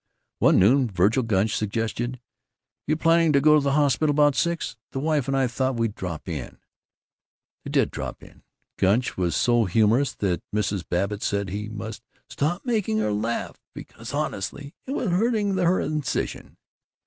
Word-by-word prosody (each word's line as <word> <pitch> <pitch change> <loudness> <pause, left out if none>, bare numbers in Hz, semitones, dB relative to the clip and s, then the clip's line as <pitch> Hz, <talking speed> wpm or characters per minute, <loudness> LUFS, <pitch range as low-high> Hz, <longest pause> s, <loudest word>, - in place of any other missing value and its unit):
One - - +5
noon 125 +6 +4
Vergil 100 +6 +2
Gunch 110 -2 +1
suggested, 115 +4 -2 0.7
"You 155 +1 +1
planning 165 -1 +3
to 140 - +5
be 150 +2 +5
at 150 - +5
the 140 0 0
hospital 145 0 +2
about 145 0 +4
six? 170 -1 -1 0.2
The 135 - -2
wife 150 -2 0
and 135 0 0
I 135 - +3
thought 130 +2 -1
we'd 115 -2 -1
drop 85 -6 -6
in." 75 -8 -5 1.1
They - - -7
did - - +2
drop - - -6
in. - - -16 0.4
Gunch 105 +6 +2
was 90 -3 -1
so 120 -2 +3
humorous 110 +8 +2
that 95 -4 -1
Mrs. 100 -5 -1
Babbitt 100 +4 -1
said 100 -1 -1
he 105 +3 -4
must 110 +1 -7 0.3
"stop 175 - -1
making 215 - 0
her 110 -1 0
laugh 110 +3 -3
because - - -9
honestly 140 +9 -4
it 270 - -3
was 230 -9 -1
hurting 205 +1 +1
her 180 0 +2
incision." 150 -2 -3
120 Hz, 165 wpm, -24 LUFS, 105-150 Hz, 1.1 s, One